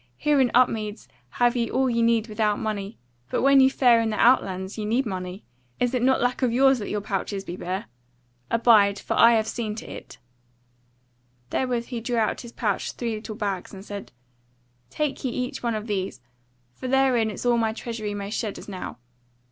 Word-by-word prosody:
Here 295 -2 +3
in 250 - +3
Upmeads 220 -4 +1 0.3
have 240 0 +2
ye 235 -2 0
all 265 +1 +1
ye 235 -2 +1
need 230 -1 +2
without 215 -1 0
money, 210 -1 -4 0.3
but - - -1
when 275 0 +6
ye 265 0 +7
fare 245 -3 +4
in 225 - 0
the 215 - -2
outlands 190 -6 +2
ye 215 - -4
need 235 +6 +1
money; 185 -1 -5 0.4
is 245 0 +1
it 250 - 0
not 260 +1 +3
a - - 0
lack 245 +2 0
of 250 -2 +2
yours 265 +1 +4
that 205 - -5
your 210 - -2
pouches 195 0 -3
be 175 - -6
bare? 185 +4 -4 0.6
Abide, 215 -4 +5
for - - -3
I 230 0 +6
have 220 -1 +2
seen 220 -1 -3
to 220 - -8
it." - - -10 1.3
Therewith 245 -3 -1
he 240 -3 -4
drew 240 +1 -2
out 220 -1 +2
of - - -8
his 235 -2 -9
pouch 210 -5 -2
three 235 -2 -3
little 215 0 -6
bags, 200 -3 -4
and 195 +1 -10
said; 200 -1 -7 0.8
"Take 295 - -2
ye 260 - 0
each 250 +1 -4
one 235 -2 -1
of 215 0 -4
these; 195 - -3 0.5
for 190 - -7
therein 255 -4 +3
is 215 - -6
all 245 - +4
that 235 - +2
my 225 -1 +1
treasury 220 -2 -5
may 200 0 -5
shed 215 -2 -3
as - - -10
now. 190 -3 -6
225 Hz, 210 wpm, -25 LUFS, 205-245 Hz, 1.3 s, ye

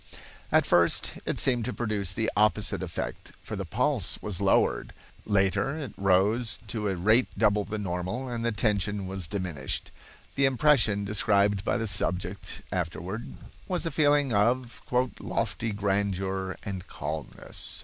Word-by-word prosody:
At - - +4
first 85 0 +3
it - - -1
seemed 125 -4 +2
to 125 - -2
produce 105 -5 -1
the 110 - 0
opposite 105 -2 +2
effect, 90 -2 -5
for - - -5
the - - -4
pulse - - +1
was 100 -3 -3
lowered. 100 - +2 0.3
Later 100 +7 +2
it 140 -9 -6
rose 100 +4 +2
to 105 -1 -2
a 95 - 0
rate 110 +8 +3
double 105 -1 +3
the 110 +1 -4
normal, 95 +6 -3
and 120 -2 -3
the 115 - +1
tension 105 -2 0
was 95 -2 -3
diminished. 90 -9 -3 0.4
The 140 - +3
impression 130 -7 +4
described 100 -1 +2
by - - +1
the 115 - -1
subject 95 -1 -2
afterward 90 +5 -3 0.4
was 180 -2 0
a 165 - -1
feeling 145 -3 +3
of 120 +4 +1 0.4
"lofty 110 +4 -2
grandeur 95 -2 -1
and 95 -2 -5
calmness." 75 -2 -5
105 Hz, 145 wpm, -28 LUFS, 95-115 Hz, 0.4 s, At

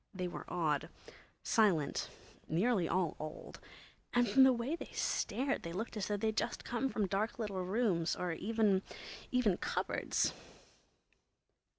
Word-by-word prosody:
They 185 -1 -2
were 175 - -6
odd, 155 -5 0 0.5
silent, 190 -10 +2 0.4
nearly 190 +2 +2
all 180 -4 +1
old, 155 0 -7 0.6
and 245 0 +4
from 240 +6 +5
the 265 - +8
way 245 +5 -1
they - - -8
stared 275 +2 0
they 170 - -6
looked 220 +6 -4
as 205 -3 -2
though 205 - 0
they'd 220 +1 0
just 235 - -1
come 245 +3 -1
from 215 -5 0
dark 200 +4 -1
little 200 -5 -2
rooms 185 -4 +1
or 180 -1 -2
even—even 210 +2 0
cupboards! - - 0
205 Hz, 135 wpm, -35 LUFS, 180-235 Hz, 0.6 s, the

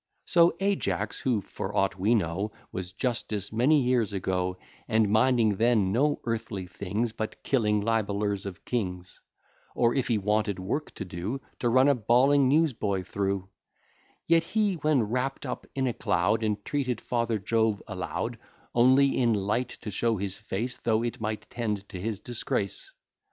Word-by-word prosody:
So, 170 -1 +4
Ajax, 200 0 -1
who, 120 -6 +1
for 100 +1 -5
aught 95 0 +1
we 105 +6 +3
know, 100 +1 -1 0.2
Was 90 -1 -5
justice 105 -2 -2
many 135 +7 +4
years 120 -4 +1
ago, 90 -1 -1 0.3
And 110 -2 +3
minding 110 -2 +3
then 110 -4 +3
no 145 +7 +2
earthly 110 -5 -3
things, 100 +5 -2
But 110 0 -5
killing 105 -6 +2
libellers 100 -2 0
of 95 - -9
kings; 90 -7 -3 0.6
Or 120 -1 +3
if 135 - 0
he 115 - +2
wanted 105 -1 0
work 105 +12 -3
to 100 - -5
do, 95 +8 -4 0.2
To 120 - +1
run 130 +3 +5
a 145 - +6
bawling 130 +4 +4
news 155 +1 +3
boy 100 -4 -1
through; 95 -1 -2 0.8
Yet 165 0 +4
he, 210 +2 +1
when 150 -5 +2
wrapp'd 125 +5 -2
up - - -5
in 135 -1 0
a 125 - 0
cloud, 105 +5 +1
Entreated 115 +4 -1
father 115 -2 -1
Jove 110 +1 +1
aloud, - - -4 0.3
Only 130 +3 +5
in 120 -3 +3
light 105 +5 0
to 105 - -5
show 115 +3 +1
his 95 0 -3
face, 115 +4 -3
Though 115 0 +1
it 120 -2 -3
might 110 0 -3
tend 105 -4 -3
to 90 - -7
his 110 -1 -3
disgrace. 110 -4 -3
110 Hz, 160 wpm, -28 LUFS, 100-125 Hz, 0.8 s, a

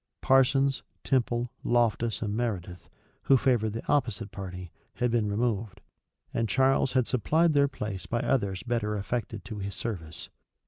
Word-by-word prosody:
Parsons, 135 +1 +3 0.2
Temple, 120 -2 0
Loftus, 120 -1 +1
and 105 -1 -2
Meredith, 95 -7 -3 0.4
who 135 - +6
favored 115 -5 +1
the 115 - -5
opposite 115 -7 0
party, 90 -4 -7 0.2
had 125 -1 0
been 115 -3 +1
removed; 105 -2 -1 0.5
and 115 -1 0
Charles 135 +2 +3
had 130 -2 +3
supplied 155 - +2
their 140 -1 +4
place 105 -8 -5
by 120 +4 -1
others 100 -8 0
better 115 -3 -1
affected 110 0 -4
to 110 -3 -6
his 100 0 -4
service. 85 -8 -6
115 Hz, 145 wpm, -28 LUFS, 100-125 Hz, 0.5 s, who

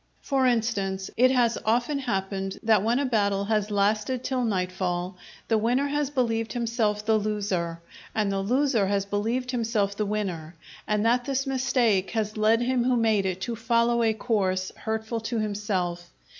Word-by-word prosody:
For 270 -2 +2
instance, 200 -5 -1
it 255 +2 +5
has 240 -3 +2
often 240 +6 +1
happened 195 -5 -3
that 220 -3 +4
when 230 +4 +1
a 280 - +1
battle 200 -5 +1
has 210 -1 0
lasted 210 +5 0
till 255 -1 -1
nightfall, 185 -3 -2 0.3
the 225 -1 +2
winner 245 +5 +1
has 290 -1 0
believed 230 -5 -1
himself 225 -3 -1
the 220 0 +3
loser, 200 -6 -2 0.3
and 210 -2 +1
the 195 - -1
loser 240 0 +1
has 200 0 0
believed 225 +6 -1
himself 220 -5 0
the 210 0 -1
winner 180 -6 -3 0.3
and 210 0 +1
that 245 +2 +2
this 275 0 -1
mistake 245 -7 +1
has 215 -1 -1
led 220 +2 +3
him 250 0 +1
who 255 0 +3
made 220 -4 +2
it 185 0 -3
to 235 +2 -3
follow 235 +1 +2
a 220 -1 +2
course 190 -5 0
hurtful 220 +1 -3
to 225 +2 -3
himself. 195 -5 -2
220 Hz, 170 wpm, -26 LUFS, 200-240 Hz, 0.3 s, it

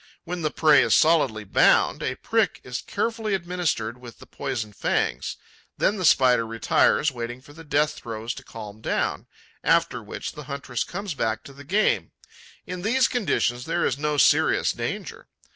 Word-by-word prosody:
When 175 0 -5
the 155 - 0
prey 150 -2 +5
is 115 -3 +3
solidly 150 -10 +3
bound, 100 - +3
a - - -2
prick - - 0
is - - -5
carefully 225 -3 -2
administered 170 - -2
with 120 -2 -11
the - - -14
poison 120 -7 -4
fangs; - - -1 0.4
then 210 - +1
the 185 - -1
Spider 125 -6 +5
retires, 115 +6 +2
waiting 120 0 -6
for 140 +3 -16
the 165 +2 -12
death 150 0 +1
throes 115 0 -5
to - - -11
calm 110 -1 -10
down, - - -1 0.4
after - - +2
which - - -6
the 150 - -10
huntress 140 -3 -3
comes 195 0 -5
back 110 -4 -2
to 140 - -12
the 140 +1 -12
game. 200 +9 +1 0.5
In 180 0 -6
these 250 +7 +3
conditions, 125 - 0
there 170 +1 0
is 130 - -1
no 150 0 -1
serious - - +4
danger. - - -5
140 Hz, 170 wpm, -24 LUFS, 120-175 Hz, 0.5 s, prey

